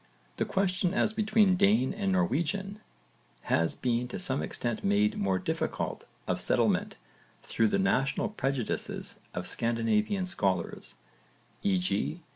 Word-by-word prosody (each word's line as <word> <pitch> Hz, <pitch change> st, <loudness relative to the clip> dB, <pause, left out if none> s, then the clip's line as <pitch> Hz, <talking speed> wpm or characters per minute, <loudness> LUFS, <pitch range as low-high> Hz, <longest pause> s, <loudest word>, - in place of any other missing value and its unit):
The -, -, 0 dB
question 185 Hz, -1 st, 0 dB
as 215 Hz, -, +2 dB
between 215 Hz, -3 st, +3 dB
Dane 200 Hz, -8 st, +3 dB
and 200 Hz, -2 st, -1 dB
Norwegian 185 Hz, +3 st, 0 dB, 0.6 s
has 80 Hz, 0 st, +1 dB
been 120 Hz, -1 st, 0 dB
to 120 Hz, -, -5 dB
some 135 Hz, -7 st, +1 dB
extent 120 Hz, -2 st, -3 dB
made 100 Hz, +1 st, +2 dB
more 95 Hz, -1 st, +1 dB
difficult -, -, -3 dB, 0.2 s
of -, -, -1 dB
settlement -, -, +1 dB, 0.5 s
through 115 Hz, -, +1 dB
the -, -, +1 dB
national 195 Hz, -1 st, +1 dB
prejudices 135 Hz, -, -3 dB, 0.2 s
of -, -, -3 dB
Scandinavian 115 Hz, -, +1 dB
scholars; 95 Hz, -, -2 dB, 0.7 s
e.g. 100 Hz, -, 0 dB
140 Hz, 120 wpm, -29 LUFS, -, 0.7 s, between